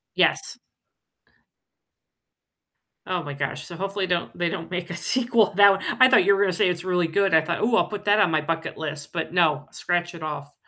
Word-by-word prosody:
Yes. - - 0 2.5
Oh 180 -2 -2
my 145 - -6
gosh, 140 +1 -4
so 170 - -10
hopefully 195 +2 -3
don't 175 -1 -2
they 175 -1 0
don't 165 -3 -6
make 180 -1 -5
a 175 - -5
sequel 235 +3 +1
to - - -16
that 200 0 +8
one 195 - -1 0.2
I 255 - +8
thought 255 - +5
you 200 +1 +4
were 195 - -1
gonna 190 -3 +2
say 180 - +2
it's 175 -1 -3
really 180 -2 0
good. 195 +3 0
I 160 - +6
thought, 170 +2 -3
"Ooh, 230 +1 +2
I'll - - +2
put 205 -1 -7
that 205 +1 +3
on 200 -5 +4
my 155 -1 +1
bucket 165 +1 -4
list." 150 -1 -6
But 165 0 -4
no, 155 -4 +1
scratch 175 0 -2
it 165 - -11
off. 150 -2 -6
175 Hz, 220 wpm, -24 LUFS, 160-195 Hz, 2.5 s, that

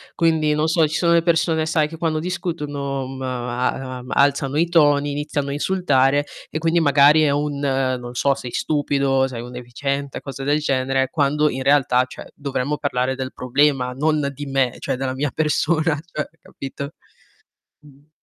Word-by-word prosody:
Quindi, 160 -2 +2
non 155 +1 +1
so 165 -1 +3
ci 155 - -4
sono 170 +1 +3
le 170 - +5
persone 165 -1 +2
sai 160 -1 +1
che 165 +1 -10
quando 160 -2 0
discutono, 150 -6 -3
uhm, 130 0 -8
a 125 -1 -2
ma 130 -1 -6
ma 125 - -5
alzano 140 0 +2
i 170 +2 +3
toni, 145 -4 +3
iniziano 145 -1 -2
a - - -2
insultare 145 -4 +2 0.2
e - - -3
quindi 165 +2 +2
magari 145 +1 +5
è 150 - +3
un, 145 0 -1
non 130 -3 -1
so, 140 +2 +2
"sei 125 -3 -7
stupido, 140 -3 +1
sei 120 -3 -6
un 125 - -9
deficiente," 140 +3 -4
cose 135 -1 -7
del 145 +2 +2
genere, 135 -2 0
quando 150 +1 +2
in 130 0 -4
realtà 135 -3 +4
cioè - - -10
dovremmo 140 0 -2
parlare 130 -2 -1
del 130 0 -5
problema, 130 0 +1
non 150 +1 +1
di 145 +2 -7
me, 135 -3 +1
cioè - - -2
della 130 0 -2
mia 135 +1 -2
persona 155 0 +1
cioè 150 - -3
capito? 140 +2 -7 0.9
Mh. 145 0 -20
140 Hz, 180 wpm, -21 LUFS, 130-150 Hz, 0.9 s, le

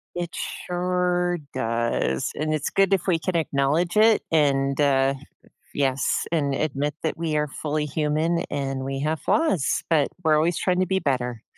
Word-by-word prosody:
It 175 -1 -4 0.3
sure 180 0 0 0.2
does, 115 - -1
and 155 +1 -1
it's 155 -3 -1
good 195 0 +2
if 195 - 0
we 175 -3 +3
can 175 +2 -3
acknowledge 155 +3 0
it 220 0 +5
and, 140 -3 +2
uh 135 -1 +3 0.6
yes, 135 -2 0
and 145 -4 0
admit 145 0 -1
that 160 - -1
we 160 -2 -1
are 150 0 0
fully 150 +1 -3
human 155 +3 0
and 135 -1 -3
we 135 0 -3
have 155 +1 -1
flaws, 250 - +1
but 150 -4 +4 0.2
we're 155 -2 +4
always 160 +3 +2
trying 180 -1 +1
to 185 - +3
be 190 +1 +1
better. 125 - -2
155 Hz, 165 wpm, -24 LUFS, 135-175 Hz, 0.6 s, it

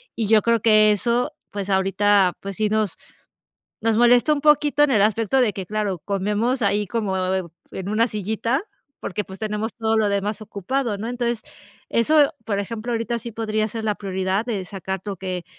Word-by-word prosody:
Y 225 - -1
yo 215 0 +5
creo 230 +1 +2
que 215 -1 +5
eso, 235 +4 0 0.2
pues 200 -1 -5
ahorita, 195 0 +3
pues 195 0 -6
sí 215 -1 +1
nos 215 -3 0 0.9
nos 225 -1 +2
molesta 240 +5 +5
un 290 - -3
poquito 295 -1 +4
en 295 - +1
el 215 - +4
aspecto 225 +4 +2
de 235 -5 +2
que, 190 - -5
claro, 205 -2 -2
comemos 210 - -1
ahí 205 0 +1
como 205 -2 -2 0.2
en 185 -2 -2 0.2
en 190 0 -5
una 225 +3 +2
sillita 220 +5 -1 0.4
porque, 210 +2 -3
pues, 190 +1 -11
tenemos 215 0 -3
todo 225 -1 0
lo 215 -1 +2
demás 200 +2 -2
ocupado, 215 +2 -2
¿no? 220 +3 -4
Entonces 240 -2 -2 0.5
eso, 290 +5 +3
por 210 -2 -1
ejemplo, 225 +3 -5
ahorita 230 +1 -1
sí 235 - -7
podría 215 -1 -1
ser 225 +1 -5
la 210 -1 +1
prioridad 190 +1 -1
de 210 -6 -2
sacar 190 0 -5
lo 200 -2 -4
que, 185 -1 -4
215 Hz, 190 wpm, -22 LUFS, 200-230 Hz, 0.9 s, yo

